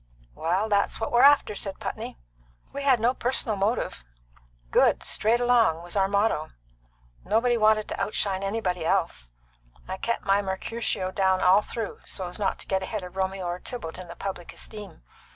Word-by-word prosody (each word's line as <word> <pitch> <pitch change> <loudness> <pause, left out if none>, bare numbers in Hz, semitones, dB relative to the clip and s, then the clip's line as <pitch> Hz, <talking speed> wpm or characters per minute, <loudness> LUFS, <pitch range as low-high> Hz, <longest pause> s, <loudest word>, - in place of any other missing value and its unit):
"Well, 180 - 0
that's 200 -2 +1
what 225 - -2
we're 240 - +4
after," 285 -6 +6
said 195 -1 -4
Putney. - - -5 0.6
"We 280 - -4
had 270 -4 +4
no 235 +3 +3
personal 245 -4 0
motive; 200 - -1 0.7
good, - - +5
right - - -11
straight 225 +3 +1
along, 235 -10 +3
was 175 +2 -7
our 195 -1 +3
motto. 200 -6 0 0.7
Nobody 230 +4 +2
wanted 215 -1 +3
to - - -4
outshine 195 -2 0
anybody 195 -4 -1
else. - - -1 0.6
I 190 +1 -4
kept 235 +4 -2
my 195 +1 +3
Mercutio 190 0 -3
down 190 -1 +2
all 185 +3 +6
through, 220 0 -5
so's 180 0 -5
not 200 - 0
to - - -9
get 190 -1 0
ahead 200 +1 -4
of 180 0 -9
Romeo 190 -1 -2
or 175 +1 -3
Tybalt 185 -9 -6
in 180 - -8
the 170 - -9
public 190 -3 -6
esteem. 210 - -9
200 Hz, 175 wpm, -26 LUFS, 185-225 Hz, 0.7 s, after